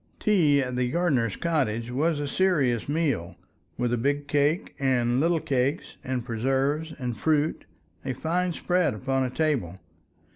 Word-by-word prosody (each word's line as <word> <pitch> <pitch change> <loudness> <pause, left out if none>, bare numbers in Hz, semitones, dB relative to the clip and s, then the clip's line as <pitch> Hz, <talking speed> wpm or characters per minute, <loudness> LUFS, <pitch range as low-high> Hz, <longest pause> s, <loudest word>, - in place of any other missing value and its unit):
Tea 155 -10 +3
at 125 -1 -4
the 125 0 0
gardener's 140 - +1
cottage 125 -8 -1
was 150 +4 +1
a 145 - -2
serious 140 - +1
meal, 140 - -1 0.4
with 120 0 0
a 120 - 0
big 145 +3 0
cake 145 +4 +1
and 125 -2 +2
little 165 +2 +2
cakes, 135 +2 -1
and 125 -2 -3
preserves 135 +6 0
and 125 -5 -4
fruit, 155 0 +1 0.4
a 130 - -2
fine 175 +7 -1
spread 175 -5 0
upon 135 +4 0
a 130 - -1
table. 125 - -1
140 Hz, 150 wpm, -26 LUFS, 125-160 Hz, 0.4 s, Tea